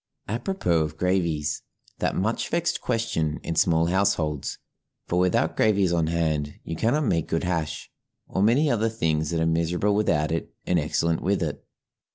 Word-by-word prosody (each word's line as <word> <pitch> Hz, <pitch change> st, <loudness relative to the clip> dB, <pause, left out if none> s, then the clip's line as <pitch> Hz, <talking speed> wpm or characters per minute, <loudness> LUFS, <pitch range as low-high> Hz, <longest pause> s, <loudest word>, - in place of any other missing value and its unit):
Apropos 115 Hz, -, 0 dB
of 75 Hz, 0 st, -3 dB
gravies 85 Hz, -5 st, 0 dB, 0.4 s
that -, -, 0 dB
much 110 Hz, +5 st, -1 dB
vexed 170 Hz, 0 st, 0 dB
question 80 Hz, -9 st, -1 dB
in 85 Hz, -, -3 dB
small 80 Hz, 0 st, +3 dB
households 85 Hz, -5 st, 0 dB, 0.5 s
for 90 Hz, -, +1 dB
without 90 Hz, 0 st, +2 dB
gravies 100 Hz, -5 st, +3 dB
on 85 Hz, -2 st, +1 dB
hand 80 Hz, -3 st, -1 dB
you 80 Hz, -, -5 dB
cannot 120 Hz, -, +1 dB
make 85 Hz, -8 st, +1 dB
good 80 Hz, -, -1 dB
hash, 85 Hz, -4 st, -2 dB, 0.4 s
or 95 Hz, -, -2 dB
many 120 Hz, +9 st, +4 dB
other 115 Hz, -4 st, +2 dB
things 80 Hz, -8 st, 0 dB
that 85 Hz, -1 st, -1 dB
are 80 Hz, -, +2 dB
miserable 85 Hz, +5 st, +1 dB
without, 75 Hz, -8 st, +1 dB
and 85 Hz, +1 st, -2 dB
excellent 80 Hz, +2 st, 0 dB
with 95 Hz, -1 st, +1 dB
it. 75 Hz, -3 st, -4 dB
85 Hz, 160 wpm, -25 LUFS, 80-105 Hz, 0.5 s, many